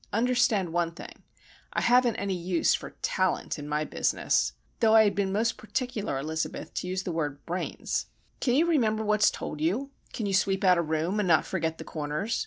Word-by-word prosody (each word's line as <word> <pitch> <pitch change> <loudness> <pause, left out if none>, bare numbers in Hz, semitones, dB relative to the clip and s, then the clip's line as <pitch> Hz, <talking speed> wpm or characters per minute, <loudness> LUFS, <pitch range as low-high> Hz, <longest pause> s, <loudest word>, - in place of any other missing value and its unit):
Understand 220 -6 +2
one 170 -1 0
thing. 170 - -11 0.5
I - - 0
haven't 245 -1 +4
any 200 -1 -2
use 175 -1 +1
for - - -4
talent 185 -4 0
in 145 0 -7
my 150 +1 0
business' - - 0 0.3
(though 225 -2 +5
I 220 - +8
had 205 - +2
been 195 -1 0
most 225 +3 0
particular, 215 - -3
Elizabeth, 155 +3 -4
to - - -3
use 185 +1 -2
the 180 - -3
word 145 -4 -3
brains). 180 +2 -3 0.3
'Can 245 -2 +1
you 315 +5 +4
remember 225 -10 +2
what's 210 0 +4
told 150 - -6
you? 225 - 0 0.2
Can 220 - -4
you 200 - -1
sweep 190 0 +2
out 180 -2 +5
a - - +3
room, 160 +5 -1
and 205 - +1
not 165 -2 +4
forget 160 0 -2
the - - -7
corners? 155 +8 -3
190 Hz, 195 wpm, -28 LUFS, 165-220 Hz, 0.5 s, I